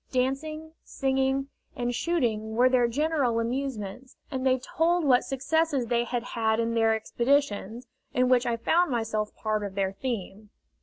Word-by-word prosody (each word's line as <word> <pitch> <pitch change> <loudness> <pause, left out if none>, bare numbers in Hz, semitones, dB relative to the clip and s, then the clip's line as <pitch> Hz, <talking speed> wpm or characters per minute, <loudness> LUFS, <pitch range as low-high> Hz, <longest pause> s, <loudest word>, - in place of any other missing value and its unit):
Dancing, 310 +5 -2
singing, 270 0 0 0.3
and 245 -2 -2
shooting 230 -8 -1
were 250 +2 +5
their 250 -2 +3
general 275 -2 +1
amusements, 245 -1 -4
and 260 -2 -3
they 260 -1 +3
told 330 +6 +1
what 255 -3 +5
successes 280 0 0
they 235 0 +1
had 240 0 -2
had 220 -2 0
in 230 0 0
their 225 -1 +3
expeditions, 235 -1 0 0.3
in 255 0 +2
which 250 0 +3
I 235 -1 0
found 340 +9 +2
myself 225 -3 -2
part 215 -1 -1
of 200 -1 -5
their 195 -1 0
theme. 210 -2 -5
245 Hz, 155 wpm, -27 LUFS, 225-270 Hz, 0.3 s, were